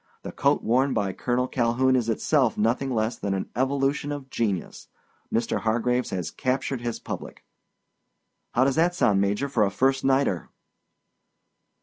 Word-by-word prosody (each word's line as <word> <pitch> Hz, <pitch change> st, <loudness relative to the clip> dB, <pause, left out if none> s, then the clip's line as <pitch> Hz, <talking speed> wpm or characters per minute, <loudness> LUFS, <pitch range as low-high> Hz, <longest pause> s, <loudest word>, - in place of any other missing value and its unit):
The -, -, -6 dB
coat -, -, +1 dB
worn 130 Hz, +4 st, +2 dB
by 95 Hz, -2 st, 0 dB
Colonel 125 Hz, +1 st, -1 dB
Calhoun 125 Hz, +2 st, +2 dB
is 120 Hz, -3 st, 0 dB
itself 125 Hz, +2 st, +1 dB
nothing 115 Hz, +5 st, +1 dB
less 115 Hz, -1 st, -1 dB
than 100 Hz, -1 st, -2 dB
an 95 Hz, -, -4 dB
evolution 135 Hz, +3 st, 0 dB
of 140 Hz, -3 st, -6 dB
genius. 100 Hz, -6 st, -2 dB, 0.4 s
Mr. 115 Hz, 0 st, 0 dB
Hargraves 120 Hz, +3 st, 0 dB
has 90 Hz, -3 st, -3 dB
captured 130 Hz, 0 st, -2 dB
his 120 Hz, -1 st, -3 dB
public.' -, -, -7 dB, 1.1 s
"How 125 Hz, -, +5 dB
does 135 Hz, +2 st, +1 dB
that 175 Hz, +2 st, +3 dB
sound, 100 Hz, -, +3 dB
Major, 100 Hz, +7 st, 0 dB
for 120 Hz, -6 st, +1 dB
a 100 Hz, -, +2 dB
first 135 Hz, +7 st, +1 dB
nighter?" 135 Hz, -9 st, +1 dB
125 Hz, 150 wpm, -25 LUFS, 110-135 Hz, 1.1 s, How